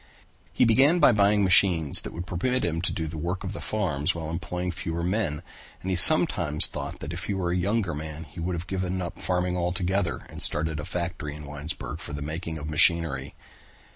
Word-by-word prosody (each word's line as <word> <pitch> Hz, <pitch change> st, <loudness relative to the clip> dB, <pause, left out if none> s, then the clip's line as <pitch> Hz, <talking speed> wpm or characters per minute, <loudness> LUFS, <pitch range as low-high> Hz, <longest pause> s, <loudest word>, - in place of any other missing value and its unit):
He -, -, +2 dB
began 135 Hz, +9 st, +4 dB
to 125 Hz, -, +6 dB
buy 105 Hz, 0 st, +3 dB
machines 95 Hz, -6 st, +4 dB
that -, -, -7 dB
would 85 Hz, +2 st, -6 dB
permit 125 Hz, +9 st, -1 dB
him 80 Hz, -1 st, -2 dB
to 90 Hz, -, 0 dB
do 80 Hz, -, -3 dB
the 80 Hz, 0 st, -6 dB
work 90 Hz, +4 st, -3 dB
of 95 Hz, +1 st, -5 dB
the -, -, -7 dB
farms 85 Hz, -10 st, -1 dB
while 80 Hz, -1 st, -5 dB
employing 90 Hz, +2 st, -4 dB
fewer 85 Hz, 0 st, -4 dB
men 90 Hz, -5 st, -2 dB, 0.4 s
and 95 Hz, -, -3 dB
he -, -, +1 dB
sometimes 85 Hz, -, +5 dB
thought -, -, -5 dB
that 75 Hz, +4 st, -6 dB
if 85 Hz, -, -5 dB
he 100 Hz, -, -2 dB
were 90 Hz, -2 st, -2 dB
a -, -, 0 dB
younger 100 Hz, +3 st, -1 dB
man 80 Hz, +1 st, -6 dB
he 80 Hz, +2 st, -13 dB
would 85 Hz, 0 st, -3 dB
give 95 Hz, -1 st, -3 dB
up 90 Hz, -1 st, -4 dB
farming 90 Hz, 0 st, -1 dB
altogether 90 Hz, +1 st, -1 dB
and -, -, -9 dB
start 75 Hz, +2 st, +6 dB
a 75 Hz, -2 st, -5 dB
factory 85 Hz, -4 st, -4 dB
in 75 Hz, 0 st, -9 dB
Winesburg 75 Hz, +2 st, -6 dB
for -, -, -7 dB
the 75 Hz, 0 st, -5 dB
making 80 Hz, +2 st, -5 dB
of 75 Hz, 0 st, -7 dB
machinery. 75 Hz, -3 st, +2 dB
85 Hz, 205 wpm, -26 LUFS, 80-95 Hz, 0.4 s, to